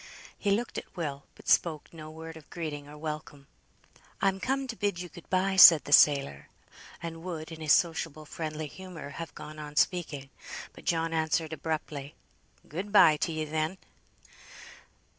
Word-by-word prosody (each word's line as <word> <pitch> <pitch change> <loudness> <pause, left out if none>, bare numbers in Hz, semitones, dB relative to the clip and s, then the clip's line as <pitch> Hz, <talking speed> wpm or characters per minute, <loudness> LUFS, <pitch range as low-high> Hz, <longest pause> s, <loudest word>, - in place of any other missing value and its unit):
He 205 - -2
looked 220 +4 0
at - - -16
Will, 140 -4 -4
but - - -17
spoke 160 -2 +2
no 155 -1 -9
word 160 +1 -9
of 160 -2 -14
greeting 150 -4 -5
or 150 - -11
welcome. 150 -2 -6 0.7
"I'm 195 -1 +1
come 270 +6 -1
to 245 -3 -5
bid 205 -5 -1
you 180 -1 -6
good 175 -1 -14
bye," 190 +1 +1
said 165 -5 +10
the - - -7
sailor, 135 - +5 0.5
and 165 -1 -6
would 165 -2 -6
in 160 -1 -9
his 155 -2 +4
sociable 165 -3 0
friendly 155 0 -5
humour 170 -1 -9
have 165 +1 -8
gone 155 0 -9
on 150 -1 -8
speaking. 150 -6 0 0.4
But - - -14
John 165 -1 0
answered 160 0 0
abruptly, 155 -3 -4 0.5
"Good 185 +7 -5
bye 155 -7 +7
to 165 - -1
ye, 155 -1 -2
then." 155 +4 -2
160 Hz, 165 wpm, -29 LUFS, 150-175 Hz, 0.7 s, said